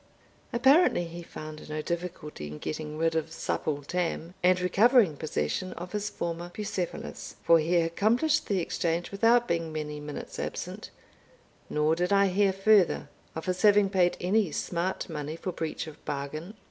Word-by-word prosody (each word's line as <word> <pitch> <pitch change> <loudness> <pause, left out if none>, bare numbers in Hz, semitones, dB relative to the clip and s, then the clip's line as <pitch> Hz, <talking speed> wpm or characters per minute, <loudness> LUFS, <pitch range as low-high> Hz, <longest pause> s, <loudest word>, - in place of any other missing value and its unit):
Apparently 265 - +5
he 170 +1 -8
found 155 -2 -9
no 155 0 -3
difficulty 165 - -5
in 75 +1 -7
getting 155 - -5
rid 165 0 +1
of 160 0 -1
Supple 145 -2 -2
Tam, 170 +1 -2
and 185 0 +4
recovering 195 - +4
possession 165 +4 -2
of 180 +1 -8
his 210 0 -2
former 170 -2 -4
Bucephalus, 185 -2 -5
for 165 0 +6
he 165 +3 +1
accomplished 220 - +2
the 200 - +1
exchange 170 -1 -1
without 230 +4 +4
being 165 -1 -1
many 150 -1 -4
minutes 150 0 -7
absent; - - -5 0.8
nor 150 +1 +2
did 180 +3 -1
I 200 -1 +5
hear 195 +1 +3
further 195 -1 +3 0.3
of 160 - -5
his 180 -1 -1
having 205 -2 +5
paid 180 -3 +3
any 190 -1 +2
smart 175 +4 -2
money 150 -1 -4
for 185 +2 -4
breach 160 -2 -4
of 155 -2 -12
bargain. 155 +8 -5
175 Hz, 160 wpm, -28 LUFS, 155-195 Hz, 0.8 s, for